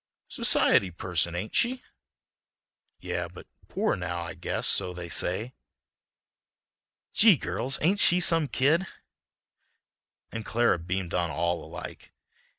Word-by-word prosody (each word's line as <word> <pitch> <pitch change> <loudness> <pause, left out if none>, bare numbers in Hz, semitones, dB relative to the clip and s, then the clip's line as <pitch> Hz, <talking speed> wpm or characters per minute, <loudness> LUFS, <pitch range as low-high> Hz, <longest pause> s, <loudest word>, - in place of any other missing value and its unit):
"Society 95 - +3
person, 85 -1 -1
ain't 100 +5 -5
she?" 250 +2 +1 1.2
"Yeah, - - -4
but - - -13 0.2
poor 215 +2 -1
now, 90 -1 -4
I 85 - -6
guess; 90 -2 -4
so 90 -1 +1
they 85 -1 -7
say." 105 +9 0 1.6
"Gee! 210 -6 +6
girls, 130 +1 -1
ain't 190 +6 +2
she 180 -2 +4
some 165 -3 +4
kid!" 150 +9 +1 1.4
And 115 - -5
Clara 115 -5 +1
beamed 90 +1 -4
on 85 -1 0
all 85 +2 -2
alike. - - -10
95 Hz, 120 wpm, -27 LUFS, -, 1.6 s, Gee